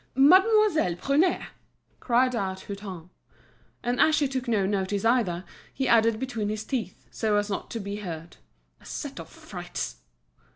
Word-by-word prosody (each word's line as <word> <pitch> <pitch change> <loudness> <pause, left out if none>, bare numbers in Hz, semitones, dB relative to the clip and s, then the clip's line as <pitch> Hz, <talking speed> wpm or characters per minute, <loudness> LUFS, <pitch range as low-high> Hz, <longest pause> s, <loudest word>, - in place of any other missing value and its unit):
"Mademoiselle 370 - +5
Prunaire!" 290 - +1 0.5
cried 250 +1 +2
out 190 -3 -2
Hutin. 190 -4 -8 0.7
And 245 +1 -1
as 315 - +5
she 295 -2 +2
took 260 -1 -3
no 215 -5 +2
notice 200 +1 -1
either, 220 -7 +2 0.3
he 265 -1 -2
added 230 -1 +4
between 230 -5 -2
his 215 0 -3
teeth, 220 -8 -4
so 215 -2 +1
as 205 0 -1
not 195 - -4
to 230 - -4
be 200 0 -5
heard: 170 -5 -7 0.4
"A - - -20
set - - -6
of - - -9
frights!" - - -6
220 Hz, 155 wpm, -27 LUFS, 195-260 Hz, 0.7 s, Mademoiselle